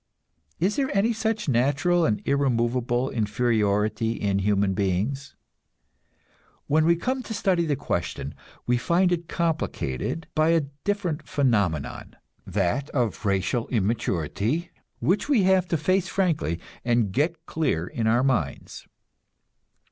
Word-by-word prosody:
Is 190 +5 +1
there 270 -2 +1
any 225 +4 +3
such 220 -2 -1
natural 145 +7 +2
and 105 -2 0
irremovable 125 -2 +1
inferiority 110 -1 +1
in 100 -3 0
human 100 -1 +2
beings? 100 +9 -1 1.3
When 155 +2 +3
we 170 +1 +5
come 255 +9 -2
to 225 -3 -6
study 180 -3 +1
the 145 - +1
question - - -3 0.3
we 125 0 +2
find 175 +8 +2
it 170 -1 -1
complicated 160 - -2
by 155 +1 +3
a 165 -3 +3 0.2
different 180 -7 -1
phenomenon, 100 - 0 0.3
that 100 +9 0
of 115 -5 -1
racial 100 +5 0
immaturity, 110 - -1 0.3
which 200 +9 0
we 250 -9 +4
have 185 -1 +3
to 165 - 0
face 185 +5 +1
frankly 160 - 0 0.2
and 120 -4 +1
get 160 - -1
clear 120 - -1
in 110 +5 -2
our 120 +3 +3
minds. 115 - -2
135 Hz, 125 wpm, -25 LUFS, 105-170 Hz, 1.3 s, we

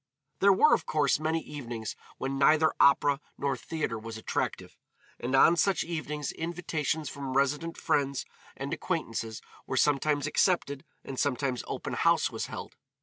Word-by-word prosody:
There 200 +1 +6
were, 300 +11 +5
of - - +1
course, 150 -2 +2
many 160 +1 0
evenings 120 -7 -6 0.2
when 135 +1 -3
neither 155 +3 +5
opera 140 0 +4 0.2
nor 140 -1 0
theatre 130 -3 -3
was 115 0 -7
attractive, 110 - -3 0.4
and 125 +3 -1
on 165 +5 +6
such 185 -1 +2
evenings 150 -3 -4
invitations 160 -2 -2
from 135 -1 -3
resident 150 +5 0
friends 140 -1 0 0.3
and - - -4
acquaintances 110 -1 -3 0.2
were 130 - -2
sometimes 145 +1 +2
accepted 155 -3 +1 0.2
and 135 - -6
sometimes 130 -3 0
open - - -4
house - - +3
was - - -4
held. - - -8
145 Hz, 145 wpm, -29 LUFS, 135-160 Hz, 0.4 s, There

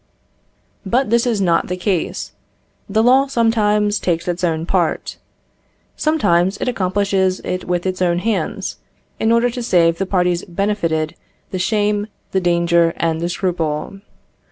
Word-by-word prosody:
But 235 +4 0
this 235 +1 +3
is 225 -4 +1
not 170 -3 +2
the 180 - -3
case. 185 -2 -2 0.6
The 215 +2 +2
law 260 +3 +5
sometimes 210 -4 +2
takes 170 -1 -1
its 175 0 -2
own 165 -2 0
part. 175 -3 -1 0.8
Sometimes 190 - +2
it - - -3
accomplishes 190 -3 0
it 185 - -4
with 175 0 -1
its 185 0 -2
own 175 -1 +2
hands, 205 +2 -2 0.4
in 220 - +2
order 235 +1 +3
to 245 - -5
save 170 -7 +2
the 195 - -1
parties 180 -2 +1
benefited 170 -5 -1 0.4
the 185 - -3
shame, 210 +1 0 0.2
the 190 - +1
danger, 170 -1 +2
and 165 -1 0
the 170 - -1
scruple. 175 -1 -2
185 Hz, 145 wpm, -19 LUFS, 170-210 Hz, 0.8 s, law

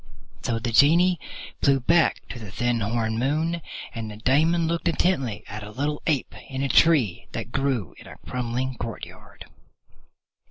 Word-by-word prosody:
So 115 - -1
the 115 +1 -2
Genie 170 +8 +5 0.4
flew 140 -1 +4
back 165 +5 +2
to 120 - -7
the 110 -3 -8
thin 120 +3 0
horned 110 +1 -1
moon, 160 +6 0 0.3
and 115 -2 -5
the 105 - -9
Daemon 160 +8 +3
looked 170 0 -1
intently 160 - 0
at 105 +1 -7
a 105 - -8
little 145 +6 -2
ape 145 -6 0 0.2
in 135 0 -3
a 140 - 0
tree 140 - +4
that - - -5
grew 135 -7 -1
in - - -13
a - - -11
crumbling 125 +1 -2
courtyard. 115 -1 -8
130 Hz, 160 wpm, -25 LUFS, 115-155 Hz, 0.4 s, Genie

